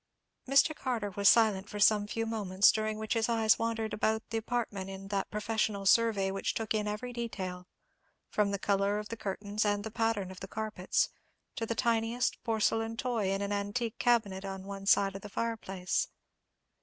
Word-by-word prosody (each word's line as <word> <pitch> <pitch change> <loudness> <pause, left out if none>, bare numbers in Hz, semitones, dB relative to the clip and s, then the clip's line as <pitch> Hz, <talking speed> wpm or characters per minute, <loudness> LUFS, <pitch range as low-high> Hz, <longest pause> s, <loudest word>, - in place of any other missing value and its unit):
Mr. 275 +3 +4
Carter 235 -8 -2
was 200 +1 +4
silent 210 -4 +4
for 210 - -6
some 205 0 +4
few 225 +2 -2
moments, 205 -3 +3
during 215 0 -2
which 220 0 -2
his 225 0 +1
eyes 225 -2 +3
wandered 225 -1 -1
about 220 +1 0
the 225 - 0
apartment 220 -5 -3
in 195 0 -8
that 195 -1 -1
professional 210 -1 -1
survey 205 -2 +4
which 195 - -2
took 225 -1 -1
in 210 -1 0
every 220 +4 -4
detail, 185 -6 -5 0.6
from 210 -1 +1
the 200 - -1
colour 200 +1 +1
of 210 0 -5
the 230 - -4
curtains 205 0 -2
and 205 -1 0
the 220 - -5
pattern 225 -4 0
of 185 - -10
the 195 - -7
carpets, 215 -3 -1 0.5
to 225 - -3
the 230 - -2
tiniest 230 +1 0
porcelain 225 0 0
toy 230 -6 -1
in 195 +1 -1
an 200 - -3
antique 205 +3 -2
cabinet 210 -6 +2
on 195 -1 -5
one 195 0 -7
side 195 -1 +4
of 195 - -6
the 210 - -9
fireplace. 220 - -2
210 Hz, 185 wpm, -31 LUFS, 195-225 Hz, 0.6 s, Mr